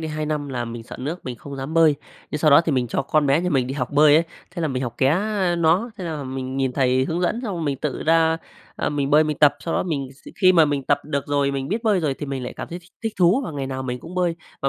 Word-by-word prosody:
đây 160 - -4
2 155 0 -3
năm 150 -2 -2
là 125 -3 -3
mình 115 0 -7
sợ 115 - -10
nước 155 +7 -5
mình 125 -1 -5
không 140 +3 -9
dám 135 +4 -5
bơi, 165 -2 +5 0.4
nhưng 150 - -2
sau 150 -1 +3
đó 145 - +8
thì 165 -2 -1
mình 125 -2 +1
cho - - -1
con 150 +1 +1
bé 140 +3 +3
nhà 180 +1 -1
mình 130 -4 +1
đi 130 - -4
học 125 -3 -2
bơi 150 0 +6
ấy, 165 - +4 0.3
thế 175 -2 -5
là 160 - +1
mình 130 -2 -2
học 120 -3 -4
ké, 130 - +3
a, 190 +3 +1
nó, 170 +8 +2
thế 185 - -5
là 155 -4 -4
mình 130 0 -5
nhìn 135 -1 0
thầy 130 -1 +2
hướng 165 +5 -2
dẫn 180 +6 0
xong 210 -6 -3
rồi 170 - -4
mình 145 -3 -1
tự - - -3
ra, 160 0 +3 0.4
à, - - -1
mình 145 -2 -1
bơi 150 +2 +6
mình 150 -1 -2
tập. 145 -1 +6
Sau 165 - -3
đó - - +1
mình 140 -6 -3
x 135 - -15
khi 185 0 +7
mà 165 -3 +6
mình 145 -2 -1
tập 145 +2 +2
được 140 -2 -3
rồi, 145 -1 +1
mình 135 -1 -3
biết 220 +5 -2
bơi 210 -5 +2
rồi 150 -4 0
thì 145 - -6
mình 135 -2 -4
lại 125 - -5
cảm - - -6
thấy 175 - -6
thích 175 0 -20
thích 225 -1 -2
thú 180 +7 +4
và - - -5
ngày 140 -2 -3
nào 130 0 -4
mình 125 -1 -4
cũng 170 +6 -10
bơi. 175 -2 0 0.3
Và 135 - +2
150 Hz, 320 wpm, -22 LUFS, 135-170 Hz, 0.4 s, đó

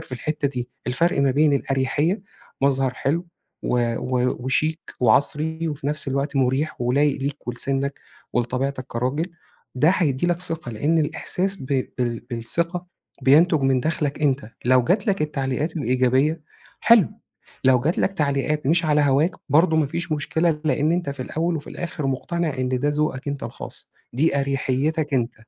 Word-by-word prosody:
في - - -12
الحتّة 150 +2 -1
دي. 125 -3 -4 0.2
الفرق 140 +5 +1
ما 140 -1 +3
بين 145 +3 +3
الأريحيّة 140 +8 0 0.4
مظهر 135 -2 +2
حلو، 165 +7 -1 0.4
و 120 -1 0
و 125 0 0
وشيك، 155 +5 -1
وعَصري، 150 +7 +2
وفي 145 -2 -5
نفس 150 -1 0
الوقت 140 +2 -1
مُريح، 135 +3 0
ولايق 140 +4 +2
ليك، 140 -2 -4
ولسِنّك، 135 +3 -2 0.3
ولطبيعتك 130 +2 -1
كراجل. 130 +9 -2 0.5
ده 150 +5 +4
هيدّي 165 -5 +1
لك 175 0 0
ثقة، 165 -7 -1
لإن 145 +9 +1
الاحساس 185 +5 0
ب - - -7 0.3
بال 120 -2 -1
بالثقة، 170 +10 -1 0.4
بينتُج 155 +3 +5
من 135 -1 +2
داخلك 150 -1 -2
أنت. 135 -5 +1
لو 130 +1 +5
جات 195 - +1
لك 200 -6 +1
التعليقات 150 +2 -2
الايجابية 130 +3 +2 0.4
حلو، 230 -8 +6 0.6
لو 130 -1 +5
جات 155 +7 0
لك 195 - +1
تعليقات 150 -2 0
مش 165 +3 +3
على 150 -1 +3
هَواك 145 +4 +3 0.2
برضه 160 +3 +4
ما 155 -3 +3
فيش 170 +3 -4
مشكلة، 155 +1 0
لإن 150 +2 +2
أنت 175 -4 -1
في 140 - -7
الاول 165 +5 -1
وفي 145 - -8
الآخر، 155 -4 -4
مُقتنع 155 +4 -1
إن 130 - 0
ده 145 +3 0
ذوقك 145 -2 -1
أنت 140 -1 -4
الخاص. 115 - -7 0.2
دي 140 +2 +2
أريحيتّك 140 +2 0
أنت. 120 -2 0
145 Hz, 160 wpm, -23 LUFS, 130-160 Hz, 0.6 s, حلو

